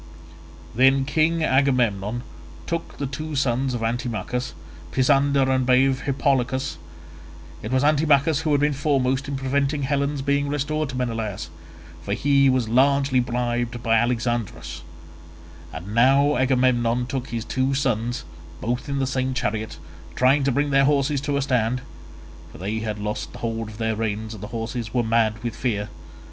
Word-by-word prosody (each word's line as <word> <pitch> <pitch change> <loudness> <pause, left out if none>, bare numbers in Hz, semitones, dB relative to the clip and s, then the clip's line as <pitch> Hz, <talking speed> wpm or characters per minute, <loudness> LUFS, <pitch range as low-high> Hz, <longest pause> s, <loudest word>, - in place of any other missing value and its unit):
Then 135 +2 +4
King 160 +3 +1
Agamemnon 120 -6 +1 0.4
took 170 -1 -4
the 140 - -2
two 155 +3 -5
sons 130 -1 0
of 115 - -3
Antimachus, 120 0 -3 0.4
Pisander 135 +1 +3
and 130 -1 +2
brave 130 +1 +3
Hippolochus. 135 -1 0 0.8
It 110 - -5
was 130 +1 +2
Antimachus 150 0 +3
who 160 -2 -1
had 145 -1 +3
been 150 0 +2
foremost 135 -2 0
in 140 - -3
preventing 140 +2 0
Helen's 140 0 -1
being 140 0 +1
restored 145 +1 -1
to 130 - -5
Menelaus, 110 -8 -3 0.5
for - - -2
he 140 -1 +3
was 130 -3 +1
largely 135 +2 +3
bribed 120 -1 -2
by 115 - +2
Alexandrus; 120 -1 -1 0.9
and 90 +6 -7
now 135 +5 +4
Agamemnon 125 -2 +2
took 130 0 -4
his 115 -1 -4
two 130 +2 0
sons, 120 -3 -1 0.3
both 125 +4 -3
in 140 - -1
the 135 - +1
same 130 0 -1
chariot, 110 -2 -2 0.4
trying 135 +3 +3
to 135 - +2
bring 145 +3 0
their 135 0 +4
horses 140 -1 +1
to 140 0 -1
a 140 - 0
stand—for 125 -2 -4
they 105 +5 -3
had 110 -1 -3
lost 105 0 -4
hold 115 -1 -3
of 105 - -11
the 110 -1 -1
reins 110 0 -3
and 105 - -10
the 105 - -6
horses 115 0 -5
were 120 - +3
mad 110 -1 +1
with 120 -2 -3
fear. 105 -5 -2
130 Hz, 155 wpm, -23 LUFS, 115-140 Hz, 0.9 s, Then